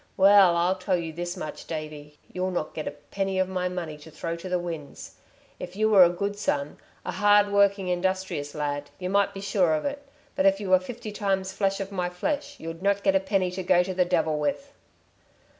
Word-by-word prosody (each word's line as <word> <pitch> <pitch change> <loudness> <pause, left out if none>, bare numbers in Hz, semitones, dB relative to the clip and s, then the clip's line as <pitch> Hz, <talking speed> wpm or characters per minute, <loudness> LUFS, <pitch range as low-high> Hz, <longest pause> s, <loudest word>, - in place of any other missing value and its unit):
Well, 195 -3 +6
I'll 180 +2 +2
tell 185 0 +1
you 165 -2 -5
this 175 +2 -4
much, 155 -4 -7
Davey, 150 -2 -7 0.2
you'll 185 +1 -1
not 175 -4 -3
get 155 - -5
a 145 - -5
penny 195 -1 -1
of 185 0 +2
my 180 -1 -2
money 170 -4 -5
to 150 - -13
throw 165 +2 -4
to 185 +2 -8
the 180 - +1
winds. 165 -5 -7 0.5
If 180 +1 -7
you 215 +1 +2
were 195 -3 +9
a 170 - +6
good 200 +3 -3
son, 145 -7 -1 0.3
a - - -2
hardworking, 200 -1 +3
industrious 180 -5 -2
lad, 145 -1 -3
y' 180 - -4
might 200 +1 +2
be 195 - -8
sure 185 -5 +2
of 155 - -3
it, 285 0 -3 0.3
but 190 - +3
if 195 0 +3
you 195 -3 -4
were 185 - +7
fifty 225 +3 -7
times 195 -2 -1
flesh 195 -1 0
of 195 0 -5
my 180 -2 -2
flesh, 285 +12 -3
you'd 165 +1 -7
not 200 0 +1
get 195 -1 +3
a - - +5
penny 190 -1 0
to 185 +1 -4
go 180 -1 +4
to 185 +1 -4
the 180 0 +3
devil 160 -3 0
with." 275 - -2
185 Hz, 220 wpm, -26 LUFS, 170-195 Hz, 0.5 s, were